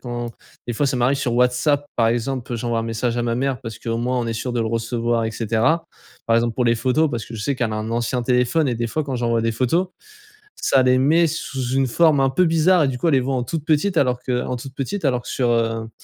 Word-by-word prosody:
quand 120 Hz, -1 st, -5 dB, 0.4 s
des 120 Hz, -, -2 dB
fois 140 Hz, +5 st, 0 dB
ça 130 Hz, -, 0 dB
m'arrive 130 Hz, +3 st, +2 dB
sur 120 Hz, -4 st, -1 dB
WhatsApp 125 Hz, +4 st, +2 dB
par 115 Hz, -2 st, +3 dB
exemple, 120 Hz, 0 st, -2 dB
j'envoie 115 Hz, 0 st, -1 dB
un -, -, -3 dB
message 115 Hz, +1 st, -2 dB
à -, -, 0 dB
ma 115 Hz, -1 st, 0 dB
mère 135 Hz, -2 st, -1 dB
parce 115 Hz, -1 st, -7 dB
qu'au 115 Hz, 0 st, -3 dB
moins 125 Hz, +1 st, -1 dB
on 120 Hz, -, -2 dB
est 115 Hz, -, -2 dB
sûr 120 Hz, +2 st, -4 dB
de 120 Hz, -, -1 dB
le 110 Hz, -, 0 dB
recevoir 115 Hz, 0 st, -1 dB
et -, -, -3 dB
cetera. 115 Hz, +9 st, 0 dB, 0.4 s
Par 115 Hz, -, +3 dB
exemple 115 Hz, -1 st, +1 dB
pour 125 Hz, -, 0 dB
les 115 Hz, 0 st, +3 dB
photos 130 Hz, +7 st, +1 dB
parce 115 Hz, -2 st, -3 dB
que 115 Hz, -, -10 dB
je 105 Hz, -, -5 dB
sais 140 Hz, +2 st, 0 dB
qu'elle 120 Hz, -3 st, -1 dB
a 110 Hz, -, -2 dB
un 110 Hz, +1 st, -4 dB
ancien 120 Hz, +1 st, -1 dB
téléphone 125 Hz, +5 st, +2 dB
et 125 Hz, -, 0 dB
des 115 Hz, 0 st, -2 dB
fois 155 Hz, +6 st, -2 dB
quand 135 Hz, -2 st, -4 dB
j'envoie 115 Hz, -1 st, 0 dB
des 115 Hz, 0 st, 0 dB
photos, 160 Hz, +11 st, 0 dB, 0.7 s
ça 130 Hz, -1 st, +2 dB
les 125 Hz, 0 st, +4 dB
met 160 Hz, +6 st, +4 dB
sous 135 Hz, -6 st, -4 dB
une 135 Hz, -1 st, +2 dB
forme 155 Hz, +2 st, +3 dB
un 135 Hz, -, +3 dB
peu 180 Hz, +7 st, +2 dB
bizarre 165 Hz, +1 st, +4 dB
et -, -, +2 dB
du 130 Hz, -, -2 dB
coup 170 Hz, -, -1 dB
elle -, -, +2 dB
les -, -, +4 dB
voit 130 Hz, +1 st, -1 dB
en 125 Hz, -, -1 dB
toute 155 Hz, +4 st, -4 dB
petites 165 Hz, +4 st, +1 dB
alors 125 Hz, -3 st, +2 dB
que 125 Hz, -1 st, -1 dB
en 125 Hz, -, -2 dB
toute 130 Hz, +2 st, -8 dB
petites, 150 Hz, +9 st, -4 dB
alors 125 Hz, -4 st, +1 dB
que -, -, -12 dB
sur, 125 Hz, -2 st, 0 dB
heu, 115 Hz, -1 st, 0 dB
125 Hz, 275 wpm, -21 LUFS, 115-135 Hz, 0.7 s, les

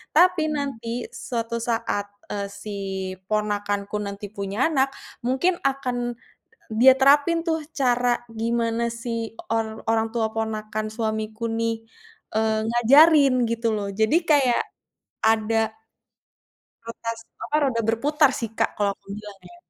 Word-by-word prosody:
Tapi, 340 Hz, -1 st, +5 dB
nanti, 245 Hz, -5 st, -3 dB
suatu 235 Hz, -1 st, -3 dB
saat, 225 Hz, -3 st, -1 dB, 0.2 s
eee, 200 Hz, -1 st, -2 dB
si 200 Hz, +1 st, -7 dB, 0.5 s
ponakanku 205 Hz, -1 st, -1 dB
nanti 200 Hz, 0 st, -5 dB
punya 200 Hz, +4 st, -1 dB
anak, 270 Hz, -3 st, +2 dB, 0.4 s
mungkin 265 Hz, +9 st, +2 dB
akan 250 Hz, -3 st, -1 dB, 0.5 s
dia 245 Hz, +4 st, +7 dB
terapin, 290 Hz, +5 st, +4 dB
tuh, 320 Hz, -2 st, -1 dB
cara 245 Hz, -2 st, +2 dB
gimana 230 Hz, +1 st, 0 dB
si 230 Hz, -1 st, -4 dB, 0.2 s
or 220 Hz, -1 st, -2 dB
orang 225 Hz, 0 st, +2 dB
tua 220 Hz, -2 st, 0 dB
ponakan 215 Hz, -1 st, -3 dB
suamiku, 220 Hz, 0 st, -2 dB
nih, 225 Hz, 0 st, -1 dB, 0.5 s
eee, 220 Hz, 0 st, +2 dB
ngajarin, 275 Hz, +4 st, +6 dB, 0.2 s
gitu, 230 Hz, 0 st, 0 dB
loh. 205 Hz, -1 st, -2 dB
Jadi, 220 Hz, +9 st, +2 dB
kayak, 275 Hz, -6 st, +4 dB, 0.6 s
ada 220 Hz, 0 st, +2 dB, 1.1 s
rotas 230 Hz, 0 st, -5 dB, 0.3 s
apa, 300 Hz, -, 0 dB
roda 250 Hz, -4 st, +1 dB
berputar, 290 Hz, +6 st, +3 dB
sih, 230 Hz, -3 st, -3 dB
Kak, -, -, +2 dB
kalau 205 Hz, -1 st, +1 dB
aku -, -, -39 dB
bilang, 210 Hz, -2 st, -10 dB
ya. 350 Hz, -, -15 dB
230 Hz, 125 wpm, -24 LUFS, 220-265 Hz, 1.1 s, dia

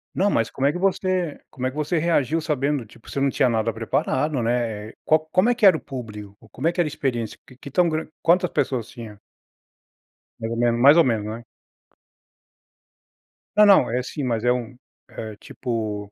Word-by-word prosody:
Não, 200 Hz, +3 st, +2 dB
mas 115 Hz, 0 st, +1 dB
como 135 Hz, -, -2 dB
é -, -, +3 dB
que 175 Hz, -, -5 dB
você, 185 Hz, -4 st, 0 dB
como 130 Hz, 0 st, -3 dB
é -, -, 0 dB
que 130 Hz, -, -12 dB
você 155 Hz, +3 st, 0 dB
reagiu 160 Hz, -2 st, +1 dB
sabendo, 145 Hz, -4 st, -1 dB
tipo, 110 Hz, -, -17 dB
você -, -, -3 dB
não 135 Hz, 0 st, +2 dB
tinha 130 Hz, -, +2 dB
nada 115 Hz, -1 st, 0 dB
preparado, 130 Hz, +5 st, -1 dB
né. 115 Hz, -2 st, -2 dB
Qual, 155 Hz, -, +4 dB
como 185 Hz, +6 st, +3 dB
é 245 Hz, -, +2 dB
que 225 Hz, -3 st, +2 dB
era 190 Hz, -, +7 dB
o -, -, -9 dB
público, 105 Hz, -6 st, -9 dB
como 140 Hz, +7 st, -3 dB
é -, -, +3 dB
que 175 Hz, -, -8 dB
era 170 Hz, -, +3 dB
a -, -, -3 dB
experiência? 120 Hz, -6 st, -3 dB, 0.2 s
Que -, -, -8 dB
tão 175 Hz, +5 st, +3 dB
gran 155 Hz, 0 st, -2 dB, 0.2 s
quantas 180 Hz, +1 st, +3 dB
pessoas 120 Hz, -5 st, -1 dB
tinha? 110 Hz, -4 st, -10 dB, 1.2 s
Mais 115 Hz, -, -4 dB
ou 115 Hz, -, -3 dB
menos, 120 Hz, 0 st, +2 dB
mais 145 Hz, +4 st, +8 dB
ou 170 Hz, -, +7 dB
menos, 110 Hz, -4 st, 0 dB
né? 110 Hz, +2 st, -6 dB, 2.1 s
Não, 210 Hz, 0 st, +7 dB
não, 200 Hz, -1 st, +6 dB
é 125 Hz, -, 0 dB
assim, 130 Hz, +3 st, -5 dB
mas 115 Hz, -3 st, -1 dB
é 125 Hz, -, +3 dB
um 125 Hz, 0 st, -3 dB, 0.3 s
eh, 110 Hz, -2 st, -7 dB
tipo 105 Hz, -5 st, -4 dB
130 Hz, 200 wpm, -23 LUFS, 115-160 Hz, 2.1 s, mais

